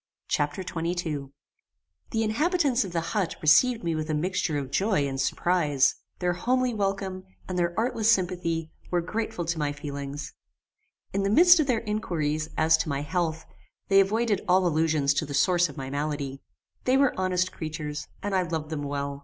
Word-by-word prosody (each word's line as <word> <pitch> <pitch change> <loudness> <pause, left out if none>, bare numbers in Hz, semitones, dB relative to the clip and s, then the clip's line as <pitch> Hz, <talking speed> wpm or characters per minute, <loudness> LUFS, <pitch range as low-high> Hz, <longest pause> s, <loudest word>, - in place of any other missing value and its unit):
Chapter 145 +6 -1
XXII 165 -4 -3 0.8
The 225 -1 0
inhabitants 280 - +2
of 190 - -6
the 170 -1 0
HUT 195 -6 0
received 225 +10 +4
me 170 -1 0
with 155 0 -3
a 155 - +1
mixture 170 -1 -1
of 135 -2 -4
joy 170 -3 +1
and 135 -1 -2
surprize. 150 -3 +2 0.2
Their 180 -1 0
homely 250 +7 +1
welcome, 195 -2 -2 0.2
and 185 - -4
their 175 -1 0
artless 225 -1 +2
sympathy, 175 -5 0 0.2
were 175 -1 +1
grateful 180 -1 -3
to 165 0 -2
my 145 -1 0
feelings. 145 0 -6 0.8
In 200 - +1
the 195 - +1
midst 350 - +7
of 300 - +2
their 240 -4 +1
inquiries, 155 -8 -1
as 160 0 +5
to 155 0 -2
my 140 0 -1
health, 165 0 -2 0.4
they 195 0 +6
avoided 210 +1 +2
all 185 +1 +4
allusions 155 -4 +2
to 155 - -1
the 145 - -4
source 175 +2 +3
of 145 - -11
my 135 -1 -5
malady. 140 -1 -3 0.4
They 255 +1 +4
were 275 -1 +3
honest 185 0 0
creatures, 155 -2 -5 0.2
and 205 0 -2
I 190 - +3
loved 160 -3 -3
them 155 -2 -3
well. 140 0 -3
175 Hz, 180 wpm, -27 LUFS, 150-195 Hz, 0.8 s, midst